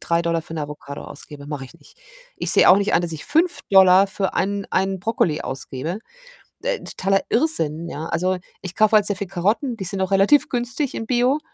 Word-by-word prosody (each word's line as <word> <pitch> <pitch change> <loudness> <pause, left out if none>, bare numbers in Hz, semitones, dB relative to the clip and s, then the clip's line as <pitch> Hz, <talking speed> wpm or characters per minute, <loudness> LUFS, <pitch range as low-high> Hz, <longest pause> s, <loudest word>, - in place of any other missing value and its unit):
3$ 170 0 0
für 160 - -10
'ne 155 - -3
Avocado 145 -1 -8
ausgebe, 145 0 -9
mache 145 -3 -5
ich - - -18
nicht. - - -20 0.4
Ich - - -2
sehe - - +5
auch 190 - +8
nicht 205 +1 0
ein, 170 - +3
dass 170 -1 -3
ich 155 - -7
5$ 200 - +4
für 195 0 -3
einen 200 +1 -1
einen 190 0 0
Brokkoli 180 -7 0
ausgebe. 135 +7 -5 0.6
Äh, - - -2
totaler 195 +1 0
Irrsinn, 170 - 0
ja? 155 0 -6
Also, 180 +3 0 0.2
ich 185 -1 -7
kaufe 215 0 +4
halt 210 -1 +5
sehr 205 - 0
viel 200 - -4
Karotten, 210 - -1
die 190 -4 -6
sind 195 +1 -3
auch 190 - -1
relativ 200 +9 +4
günstig 255 +3 -2
in 225 - -5
Bio. 250 +3 +2
190 Hz, 205 wpm, -21 LUFS, 165-220 Hz, 0.6 s, auch